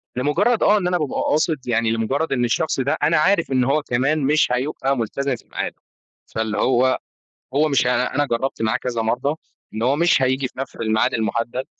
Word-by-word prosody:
لمجرد 180 - +1
آه 210 +1 +5
إن 180 -3 -1
أنا 180 0 +1
بابقى 150 -5 -2
قاصد، 150 -3 0
يعني 115 -1 +1
لمجرد 135 +8 -1
إن 120 -2 +1
الشخص 135 +4 0
ده 135 +2 0
أنا 160 0 +3
عارف 170 -1 +2
إن 130 -1 +2
هو 140 +4 +1
كمان 135 +4 0
مش 150 -1 +2
هيبقى 135 +1 -1
ملتزم 130 +4 -2
في - - -17
ميعاده، - - -3 0.6
فاللي 110 -2 -2
هو 130 +1 +2 0.6
هو 150 +2 +3
مش 135 -3 +2
ه - - +3
أنا 125 +3 +1
جربت 125 -1 -2
معاه 110 +2 +1
كذا 120 -3 -3
مرة 125 +7 -1 0.4
إن 110 - -4
هو 130 +4 +2
مش 170 -3 +3
هييجي 130 0 +1
في 130 - -15
نفس 135 - -5
الميعاد 110 +3 0
المحدد. 115 +3 -2
130 Hz, 200 wpm, -21 LUFS, 120-150 Hz, 0.6 s, آه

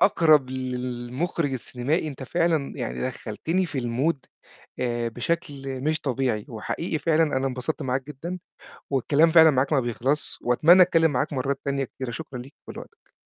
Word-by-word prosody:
أقرب 155 -8 +4
للمُخرِج 130 +4 -3
السينمائي، 130 +6 -1
أنت 135 -2 -8
فعلًا 160 0 0
يعني 125 - -4
دخّلتني 130 - -2
في 145 -4 -4
المود 130 +5 -1 0.5
آآ، 120 -1 -1
بشكل 135 0 -3
مش 155 +1 0
طبيعي 125 -5 -1
وحقيقي 155 +8 -3
فعلًا، 160 +2 +2
أنا 135 +1 0
انبسطت 130 +4 -3
معاك 130 0 -1
جدًا 165 +6 -6 0.5
والكلام 145 +4 +3
فعلًا 160 -1 +8
معاك 135 +3 +1
ما 140 - +4
بيخلصش 125 +4 -1
وأتمنى 160 +10 +6
أتكلّم 165 -3 +4
معاك 145 +3 -1
مرّات 135 +1 -1
تانية 140 -1 0
كتيرة، 130 -1 -6
شكرًا 135 -1 -7
ليك 135 +4 -11
ولوقتك. - - -11
135 Hz, 150 wpm, -25 LUFS, 125-160 Hz, 0.5 s, فعلًا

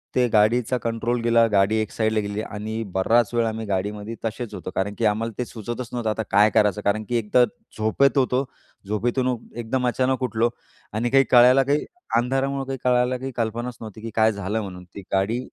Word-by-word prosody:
ते 125 -1 +3
गाडीचा 115 +4 +3
कंट्रोल 115 +1 -1
गेला. 115 0 +4
गाडी 100 +1 +3
एक 110 - -4
साईडला 110 -1 0
गेली. 100 +1 -3
आणि 110 +1 -5
बराच 115 +5 +2
वेळ 120 -1 +2
आम्ही 110 0 -3
गाडीमध्ये 105 +3 -3
तसेच 115 +1 -4
होतो. - - -6
कारण 100 +2 -1
की 115 - 0
आम्हाला 110 +2 0
ते 125 - -2
सुचवतच 120 +2 -6
नव्हतं 120 -2 -1
आता 110 +1 -1
काय 105 +2 +5
करायचं? 105 -1 +3
कारण 105 +2 +1
की 120 - 0
एकतर 115 +3 +3 0.3
झोपेत 120 +6 +2
होतो. 130 0 +2 0.4
झोपेतून 120 +4 0 0.2
एकदम 125 +2 -1
अचानक 130 +1 0
उठलो 115 -1 +1 0.4
आणि 115 +3 0
काही 135 0 +6
कळायला 125 +2 +7
काही 145 +3 0 0.3
अंधारामुळं 135 +2 0
काही 135 0 -4
कळायला 125 0 +2
काही 135 +1 -5
कल्पनाच 120 +2 -2
नव्हती, 110 -1 -9
की 115 - -5
काय 110 0 +4
झालं 100 +2 -3
म्हणून 90 -3 -8
ती 100 - -6
गाडी 100 +5 +1
115 Hz, 190 wpm, -23 LUFS, 105-125 Hz, 0.4 s, कळायला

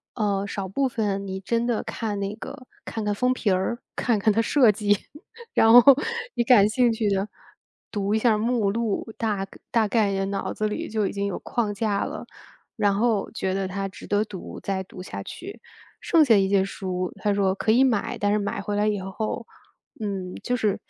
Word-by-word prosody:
呃， 200 -3 0
少 200 -1 -4
部 265 +8 0
分 205 -5 -2
你 190 0 -4
真 230 +4 -1
的 240 -2 0
看 210 -3 -3
那 200 +1 -3
个 255 +3 -9 0.2
看 220 - -5
看 205 - 0
封 250 +4 +2
皮 230 -4 -1
儿， 190 +6 0 0.2
看 230 -4 +1
看 215 +1 +3
它 225 - +3
设 250 0 +4
计， 205 0 +1 0.6
然 225 - +5
后 245 +1 +11 0.5
你 240 - +1
感 215 -4 +6
兴 245 +1 +3
趣 225 -2 0
的， 200 +1 0 0.6
读 205 -1 -1
一 220 - +2
下 220 -2 +3
目 225 -2 +1
录， 225 +1 -2
大 205 -4 -1 0.2
大 225 -2 +3
概 210 -2 +2
也 195 0 -1
脑 195 0 -3
子 215 - -1
里 210 - -4
就 215 -2 0
已 - - -3
经 200 0 -2
有 200 - -3
框 220 -4 -2
架 205 -1 0
了， - - -5 0.5
然 205 -2 +2
后 215 -1 +1
觉 190 -4 -2
得 195 0 -1
它 195 +1 -3
值 190 - -11
得 205 +1 +1
读 200 -4 -8
再 190 -1 -2
读 185 - -11
下 100 - -6
去。 390 +4 -9 0.4
剩 325 -3 +4
下 235 -6 +5
一 195 -1 +3
些 195 -1 +3
书， 185 -2 -3
他 205 -1 0
说 195 -1 +1
可 220 - +1
以 245 +4 +5
买， 235 -6 0
但 205 0 +1
是 210 - +3
买 200 -1 -2
回 205 +1 -3
来 205 +1 +2
以 205 -2 0
后， 215 +5 -4 0.5
嗯， 190 -3 -4
就 250 - 0
是 215 -4 0
205 Hz, 225 characters per minute, -25 LUFS, 195-225 Hz, 0.6 s, 后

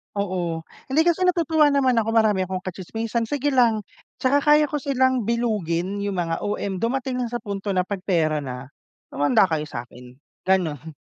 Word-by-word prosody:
Oo. 180 -5 -2 0.2
Hindi, 300 +5 +3
kasi 350 +2 +2
natutuwa 320 -4 +3
naman 260 -4 +3
ako 225 +1 -1
marami 210 -5 +3
akong 185 0 -4
kachismisan, 225 +5 -3
sige 290 +1 -1
lang. 230 -5 +3 0.3
Tsaka 280 +2 +2
kaya 300 +1 +5
ko 295 0 -2
silang 260 -4 +1
bilugin, 205 -5 -1
yung 200 -1 -2
mga 165 -2 -1
OM. 200 -2 -3
Dumating 255 +2 -1
lang 245 - -1
sa 240 +1 -5
punto 200 -1 -5
na 180 - +2
'pag 200 0 -4
pera 160 -5 +1
na, 130 -1 -7 0.4
humanda 145 +4 +3
kayo 155 -4 -1
sa 120 -4 -5
akin, 125 +1 -15 0.3
gano'n. 160 -5 0
205 Hz, 175 wpm, -23 LUFS, 175-255 Hz, 0.4 s, kaya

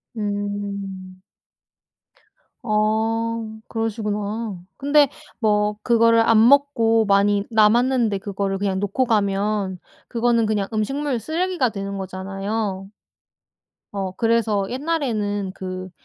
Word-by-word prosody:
음. 200 -2 -4 1.4
아 220 +1 0
그러시구나. 215 -2 -3 0.2
근데 285 0 +4 0.3
뭐 210 -1 +1
그거를 230 -1 +4
안 225 0 +5
먹고 230 -6 +4
많이 200 0 +3
남았는데 225 0 +3
그거를 195 0 -3
그냥 190 -1 -1
놓고 205 +6 0
가면 200 -3 0 0.3
그거는 235 -1 +1
그냥 205 -2 0
음식물 270 +4 -1
쓰레기가 335 -1 0
되는 200 -2 -5
거잖아요. 195 +1 -4 1.0
어 195 -2 -3
그래서 225 -1 +1
옛날에는 230 - -2
그 185 0 -6
215 Hz, 215 characters per minute, -22 LUFS, 200-230 Hz, 1.4 s, 안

